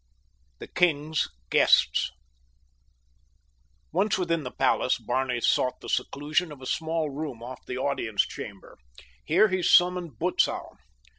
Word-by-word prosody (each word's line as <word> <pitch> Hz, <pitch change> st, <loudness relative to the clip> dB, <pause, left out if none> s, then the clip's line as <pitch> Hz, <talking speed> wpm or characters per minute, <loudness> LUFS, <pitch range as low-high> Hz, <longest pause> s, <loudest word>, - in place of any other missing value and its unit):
THE -, -, -9 dB
KING'S 160 Hz, -3 st, +1 dB, 0.2 s
GUESTS -, -, +4 dB, 1.8 s
Once 195 Hz, +6 st, +1 dB
within 165 Hz, -3 st, 0 dB
the 130 Hz, -, -5 dB
palace -, -, +1 dB
Barney 130 Hz, -2 st, -1 dB
sought 125 Hz, +2 st, +1 dB
the -, -, -9 dB
seclusion 155 Hz, +4 st, -1 dB
of 145 Hz, -, -10 dB
a 130 Hz, -, -10 dB
small 160 Hz, +1 st, -1 dB
room 140 Hz, -5 st, -6 dB
off 125 Hz, +1 st, -9 dB
the 125 Hz, -, -4 dB
audience 130 Hz, -6 st, 0 dB
chamber. 100 Hz, -2 st, -10 dB, 0.5 s
Here 215 Hz, -, +4 dB
he 185 Hz, -1 st, 0 dB
summoned 180 Hz, -1 st, +3 dB
Butzow. 180 Hz, +2 st, -1 dB
150 Hz, 125 wpm, -26 LUFS, 130-175 Hz, 1.8 s, GUESTS